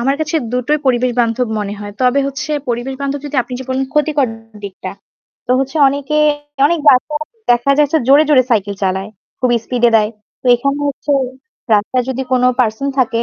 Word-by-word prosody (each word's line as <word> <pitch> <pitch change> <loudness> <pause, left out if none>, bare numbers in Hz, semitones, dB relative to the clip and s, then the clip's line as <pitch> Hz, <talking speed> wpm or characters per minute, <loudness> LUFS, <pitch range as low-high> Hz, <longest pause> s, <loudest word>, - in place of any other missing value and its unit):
আমার 270 +3 +1
কাছে 315 +1 -1 0.2
দুটোই 250 +5 0
পরিবেশ 250 -1 +2
বান্ধব 235 +1 0
মনে 205 0 -3
হয়। 205 0 -7
তবে 255 +2 +3
হচ্ছে 290 +3 -5 0.2
পরিবেশ 240 +3 -2
বান্ধব 280 0 -2
যদি 290 - -5
আপনি 250 - -13
যে 260 - -7
বলেন 260 +1 -1
ক্ষতিকর 300 -4 +1 0.4
দিকটা, 190 -2 -7 0.6
তো - - +2
হচ্ছে 270 +3 -2
অনেকে 285 +2 -2 0.5
অনেক 340 +2 +1
রাস্তা 260 +4 +2 0.4
দেখা 240 +3 +3
যাচ্ছে 295 +1 +3
জোরে, 290 +3 +6
জোরে 265 -4 +5
সাইকেল 205 -3 +1
চালায়, 190 +2 -1 0.3
খুব 255 - +2 0.2
স্পিডে 240 -1 +2
দেয়। 215 0 +2 0.3
তো - - -8
এখানে 275 +4 -1
হচ্ছে 285 +1 -3 0.6
রাস্তায় 240 +5 +1
যদি 265 0 -2
কোন 250 -1 +2 0.2
পারসন 220 +3 0
থাকে 235 -2 +1
255 Hz, 175 wpm, -16 LUFS, 235-280 Hz, 0.6 s, জোরে